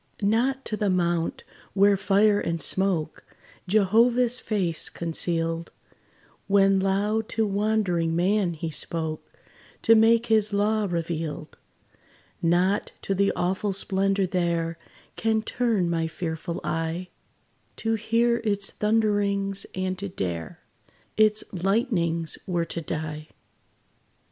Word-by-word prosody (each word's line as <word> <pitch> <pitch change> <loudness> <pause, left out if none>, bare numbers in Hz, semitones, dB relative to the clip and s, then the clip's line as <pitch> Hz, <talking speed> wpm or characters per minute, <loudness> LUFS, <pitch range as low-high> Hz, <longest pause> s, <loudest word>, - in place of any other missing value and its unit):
Not 250 +6 +1
to 215 - -2
the 210 -1 0
mount, 175 -2 0 0.3
where 200 +1 +5
fire 205 +2 +3
and 165 -3 -2
smoke 175 -4 -1 0.4
Jehovah's 230 +5 +3
face 180 -7 -2
concealed, 165 0 -2 0.8
When 195 -1 +4
loud 205 +3 0
to 220 0 0
wandering 200 -5 0
man 180 0 +1
he 160 +1 -4
spoke, 160 0 -3 0.5
To 225 - +6
make 225 +1 +5
his 215 -2 +2
law 210 +1 +1
revealed 165 -3 -4 0.9
Not 180 +4 +1
to 195 - -1
the 200 +1 +2
awful 190 +3 -1
splendor 195 0 +1
there 170 -2 -1 0.4
Can 220 -1 +1
turn 225 -6 0
my 165 -1 0
fearful 165 +1 -4
eye: 165 +3 -3 0.7
To 225 0 -1
hear 230 +2 +2
its 205 -4 -1
thunderings, 205 -2 0
and 185 0 -2
to 200 0 -4
dare 85 - -5 0.5
Its 215 0 +4
lightnings, 175 - 0
were 175 -2 0
to 170 - -4
die. 155 -1 -5
195 Hz, 115 wpm, -25 LUFS, 170-215 Hz, 0.9 s, To